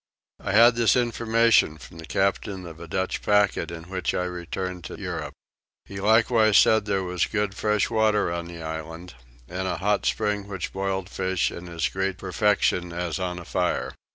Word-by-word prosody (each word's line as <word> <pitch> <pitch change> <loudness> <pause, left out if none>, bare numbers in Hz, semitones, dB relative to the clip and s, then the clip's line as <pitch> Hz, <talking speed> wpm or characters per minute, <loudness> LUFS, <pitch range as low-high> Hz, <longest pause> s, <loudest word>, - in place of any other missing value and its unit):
I 95 - -3
had 115 +2 +7
this 115 -1 +4
information 115 -7 +3
from 80 +2 -13
the 80 - -9
captain 95 0 -1
of 80 -1 -10
a 85 - -9
Dutch 95 +3 -2
packet 105 -3 +2
in 85 -1 -7
which 90 0 -3
I 90 - 0
returned 90 0 -5
to - - -8
Europe. - - -5 0.5
He 100 - -8
likewise 110 0 +4
said 110 -1 +5
there 100 -2 0
was 90 -1 -1
good 105 -2 -1
fresh 105 0 +1
water 110 -4 +2
on 85 0 -4
the 85 -1 -9
island 80 +2 -6 0.3
and 95 +2 -3
a - - -2
hot 105 +1 0
spring 105 -1 -1
which 95 -3 -5
boiled 95 -1 -2
fish 95 -2 -1
in 85 0 -8
as 85 -2 -1
great 95 0 -2
perfection 95 -2 +1
as 85 0 -3
on 90 -1 -3
a 85 - -8
fire. - - -1
95 Hz, 180 wpm, -25 LUFS, 85-105 Hz, 0.5 s, had